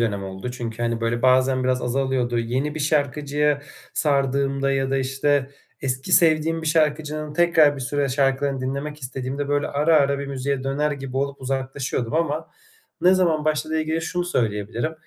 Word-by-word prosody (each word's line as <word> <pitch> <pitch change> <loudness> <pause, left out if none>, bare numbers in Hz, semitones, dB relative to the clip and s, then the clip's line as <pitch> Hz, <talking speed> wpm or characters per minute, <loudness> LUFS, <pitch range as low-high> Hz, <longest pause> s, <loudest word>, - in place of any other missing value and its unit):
dönem 100 -4 -1
oldu. 95 +5 -6
Çünkü, 120 -2 -5
hani, 115 -1 -1
böyle, 115 +1 -1
bazen 130 0 +3
biraz 130 0 +1
azalıyordu. 125 -1 0
Yeni 130 +6 -1
bir 155 - -4
şarkıcıya 145 0 +1 0.3
sardığımda 140 -1 +1
ya 135 -1 0
da, 135 - +1
işte, 135 +1 0 0.3
eski 130 +6 -3
sevdiğim 165 0 +4
bir - - -4
şarkıcının 155 -1 0
tekrar 160 -3 +4
bir - - -7
süre 140 +2 -1
şarkılarını 135 0 +1
dinlemek 140 +3 -4
istediğimde, 130 +2 -4
böyle, 145 0 +1
ara 150 +3 +3
ara 140 -1 +3
bir 140 - -4
müziğe 135 0 -2
döner 145 +2 0
gibi 135 -2 -6
olup 140 0 -2
uzaklaşıyordum 130 -1 -3
ama 160 -1 -1 0.5
ne 180 +1 +5
zaman 165 -5 +2
başladığıyla 155 +1 0
ilgili 160 +1 -1
şunu 175 +2 -2
söyleyebilirim: 115 - -1
140 Hz, 165 wpm, -23 LUFS, 130-150 Hz, 0.5 s, ne